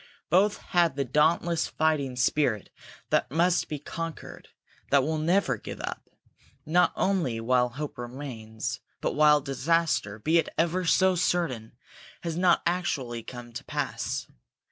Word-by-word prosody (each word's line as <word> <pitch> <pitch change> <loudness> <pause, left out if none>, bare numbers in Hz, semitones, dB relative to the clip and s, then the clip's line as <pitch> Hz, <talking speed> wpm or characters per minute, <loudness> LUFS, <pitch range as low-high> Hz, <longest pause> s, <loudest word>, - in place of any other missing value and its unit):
Both 200 +4 +4 0.2
had 170 -5 +3
the 140 -1 -1
dauntless 160 +5 +2
fighting 150 -5 0
spirit 125 -4 +1 0.4
that - - +2
must 170 +4 +2
be 150 - -3
conquered, 165 +3 -7 0.4
that 140 -1 +4
will 155 +2 -1
never 175 +6 +2
give - - -8
up, - - -6 0.6
not 175 +3 +3
only 170 -13 0
while 125 +2 +2
hope 140 +2 -6
remains, 120 -2 -5 0.2
but - - -1
while 150 -1 +5
disaster, 140 -5 0
be 160 +9 +3
it - - -1
ever 175 +2 +1
so 190 +2 +4
certain, 165 -10 -1 0.5
has 165 -2 -3
not 175 0 +3
actually 145 -10 -1
come 120 0 -10
to - - -6
pass. - - -3
150 Hz, 140 wpm, -27 LUFS, 125-170 Hz, 0.6 s, while